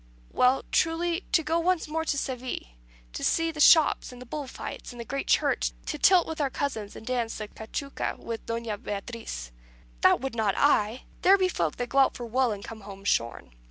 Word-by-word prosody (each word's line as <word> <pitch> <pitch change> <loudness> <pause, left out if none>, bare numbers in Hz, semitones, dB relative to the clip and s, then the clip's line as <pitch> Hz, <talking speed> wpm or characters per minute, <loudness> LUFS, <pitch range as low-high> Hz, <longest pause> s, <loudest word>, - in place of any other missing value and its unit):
"Well, 255 +1 +3
truly, 335 +2 +1
to 320 - +3
go 325 +2 +1
once 355 -1 +1
more 320 +1 -2
to 285 - 0
Seville, 255 -2 -3 0.5
to - - -5
see 330 0 +2
the 310 - -10
shops, 315 -2 +6
and 250 - -11
the 250 - -9
bull 285 +3 -5
fights, - - -7
and 240 - -11
the 235 - -5
great 275 +4 -4
Church; - - +2
to 300 - -4
tilt 365 +1 +6
with 320 -1 -4
our 280 - +1
cousins, 225 -7 -3
and - - -10
dance 240 -2 -1
the 215 - -5
cachuca 250 +7 -4
with 230 -1 -6
Doña 230 -3 -3
Beatriz." 205 - -6 0.5
"That - - +5
would 270 0 -4
not 220 -4 +1
I. 235 -4 +2 0.2
There 390 +2 +6
be 375 -1 +2
folk 170 - -1
that 245 -1 -4
go 275 - +2
out 270 - +4
for 240 - -5
wool, 250 +1 +1
and 200 -1 -5
come 225 -1 -9
home 195 -1 -10
shorn. 115 - 0
255 Hz, 210 wpm, -27 LUFS, 220-305 Hz, 0.5 s, shops